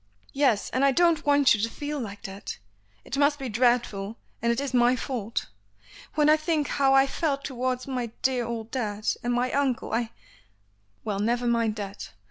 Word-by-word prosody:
"Yes; 270 -7 +2
and 260 - +1
I 275 - +5
don't 330 0 +2
want 285 -1 +5
you 210 - 0
to 230 - 0
feel 295 +4 -4
like 205 -4 -7
that. 195 +1 -7 0.5
It 275 - -3
must 290 0 +3
be 270 -3 -5
dreadful, 230 -3 +1 0.2
and 235 - +2
it 235 - 0
is 275 -2 -3
my 245 0 +4
fault. 235 -3 -3 0.7
When 300 -1 +3
I 305 +1 +6
think 310 -1 0
how 270 -1 +3
I 270 0 +6
felt 280 0 -1
towards 255 -1 -2
my 255 -3 -2 0.2
dear 255 -2 +2
old 230 -1 -5
dad, 215 -5 -3
and 240 - -1
my 245 +1 +1
uncle 270 -6 0
I 230 0 0 0.5
" 100 0 -41
"Well, 205 -2 -2
never 240 +4 0
mind 230 -2 +1
that. 200 -1 -7
245 Hz, 190 wpm, -26 LUFS, 220-275 Hz, 0.7 s, I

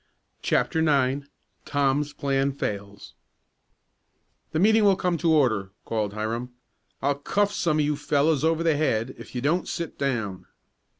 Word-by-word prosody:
CHAPTER 160 - +1
IX 140 -3 +2 0.4
TOM'S 145 +1 0
PLAN 140 0 0
FAILS 100 -5 -5 1.4
"The 155 - -1
meeting 220 +5 +4
will 200 -2 +5
come 180 -1 0
to 165 0 +2
order!" 110 -11 +2
called 105 -3 -2
Hiram. 115 +3 -3 0.5
"I'll 140 +1 +3
cuff 200 +8 0
some 160 -3 +1
of 150 - +2
you 150 0 0
fellows 150 0 +1
over 165 +1 +2
the 165 -2 +3
head 130 -5 0
if - - -11
you 125 - -2
don't 165 +7 +1
sit 170 -2 -5
down." 110 -9 -2
140 Hz, 145 wpm, -25 LUFS, 120-160 Hz, 1.4 s, will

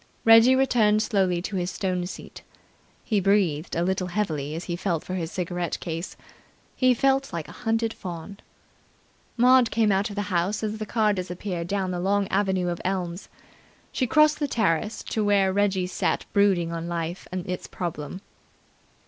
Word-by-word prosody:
Reggie 225 +3 +7
returned 235 -5 +3
slowly 185 -5 +1
to 195 0 -3
his 175 0 -1
stone 180 -2 -2
seat. - - -10 0.6
He 215 -3 +1
breathed 190 -5 +1
a 170 - +1
little 185 0 -1
heavily 160 -7 -2
as 165 - -5
he 175 - -3
felt 175 -3 -2
for 185 - -6
his 170 -2 -3
cigarette 175 -2 -3
case. 165 +1 -5 0.6
He 255 -1 +3
felt 270 +2 +1
like 165 -3 -4
a - - -11
hunted 225 -1 -1
fawn. 180 +1 -8 1.0
Maud 250 0 +5
came 220 -2 +2
out 195 +2 +1
of 205 - -8
the 205 - -1
house 185 +5 0
as 215 0 -3
the 215 - -4
car 215 -2 +2
disappeared 180 -1 -4
down 190 -1 -1
the 180 - -3
long 200 +2 +1
avenue 190 -2 +1
of 175 - -4
elms. 180 -1 -3 0.6
She 255 - -1
crossed 305 +4 +4
the 290 - 0
terrace 215 - 0
to 220 - -2
where 200 -2 +3
Reggie 195 -2 +1
sat 180 - -1
brooding 195 -5 +3
on 165 0 -4
life 170 +1 -4
and 185 0 -4
its 180 0 -4
problem. 170 0 -5
190 Hz, 175 wpm, -25 LUFS, 175-215 Hz, 1.0 s, Reggie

